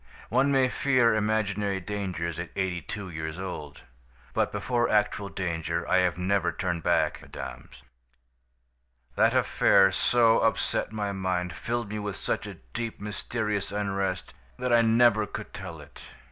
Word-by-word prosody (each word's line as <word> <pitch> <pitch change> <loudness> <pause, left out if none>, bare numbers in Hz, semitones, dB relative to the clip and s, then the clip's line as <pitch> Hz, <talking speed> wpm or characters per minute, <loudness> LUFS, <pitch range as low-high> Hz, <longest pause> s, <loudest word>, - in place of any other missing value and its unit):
One 130 +5 +3
may 135 -2 +4
fear 125 -3 +3
imaginary 105 -2 0
dangers 90 -4 -3
at 85 - -4
eighty 95 -2 -1
two 100 +5 -6
years 80 0 -5
old. 90 -6 -6 0.5
But - - +1
before 120 -2 0
actual 105 -1 +1
danger 85 -2 -2
I 95 - +4
have 90 -2 +1
never 90 -1 +1
turned 85 0 -2
back, - - +1
mesdames. 65 - -9 1.3
"That - - +4
affair 95 -1 +5
so 115 +3 +4
upset - - 0
my 105 -2 -2
mind, 90 -3 -2
filled 115 +5 -3
me 105 +1 -3
with 105 -2 -4
such - - -2
a - - -7 0.2
deep, 115 -1 -3
mysterious 105 0 -3
unrest 100 -2 -2 0.2
that 125 -1 0
I 120 - +7
never 115 -2 +4
could 110 - -7
tell 85 -4 -7
it. - - -14
100 Hz, 145 wpm, -27 LUFS, 90-110 Hz, 1.3 s, I